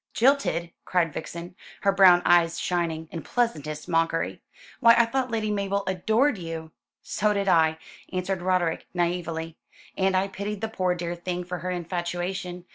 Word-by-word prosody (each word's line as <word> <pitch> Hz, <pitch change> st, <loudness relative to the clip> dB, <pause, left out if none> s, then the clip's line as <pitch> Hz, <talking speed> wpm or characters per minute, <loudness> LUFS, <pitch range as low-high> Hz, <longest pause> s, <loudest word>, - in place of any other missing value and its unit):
"Jilted!" 240 Hz, -10 st, +2 dB
cried 170 Hz, -4 st, +1 dB
Vixen, 170 Hz, +2 st, -6 dB, 0.3 s
her 200 Hz, -, +3 dB
big 195 Hz, -, -8 dB
brown 180 Hz, -3 st, +8 dB
eyes 170 Hz, -1 st, +4 dB
shining, 165 Hz, -3 st, -1 dB
in 165 Hz, -, -5 dB
pleasantest 155 Hz, -, -2 dB
mockery. 165 Hz, 0 st, 0 dB, 0.4 s
"Why 230 Hz, -3 st, +7 dB
I 235 Hz, -, +6 dB
thought 255 Hz, +2 st, -1 dB
Lady 220 Hz, -2 st, -1 dB
Mabel 200 Hz, -1 st, -1 dB
adored 220 Hz, +7 st, +1 dB
you?" 165 Hz, -2 st, -6 dB, 0.3 s
"So 210 Hz, +1 st, +1 dB
did 200 Hz, -1 st, -1 dB
I," 160 Hz, -3 st, +4 dB, 0.3 s
answered 185 Hz, 0 st, -2 dB
Roderick 180 Hz, -3 st, 0 dB
naïvely, 170 Hz, -2 st, -2 dB, 0.4 s
"and 190 Hz, -1 st, +2 dB
I 190 Hz, +1 st, +1 dB
pitied 200 Hz, +1 st, -5 dB
the 220 Hz, -, -2 dB
poor 185 Hz, -4 st, 0 dB
dear 175 Hz, 0 st, -3 dB
thing 175 Hz, +1 st, -4 dB
for 180 Hz, 0 st, -5 dB
her 180 Hz, +3 st, -4 dB
infatuation. 175 Hz, +1 st, -3 dB
180 Hz, 160 wpm, -26 LUFS, 170-200 Hz, 0.4 s, brown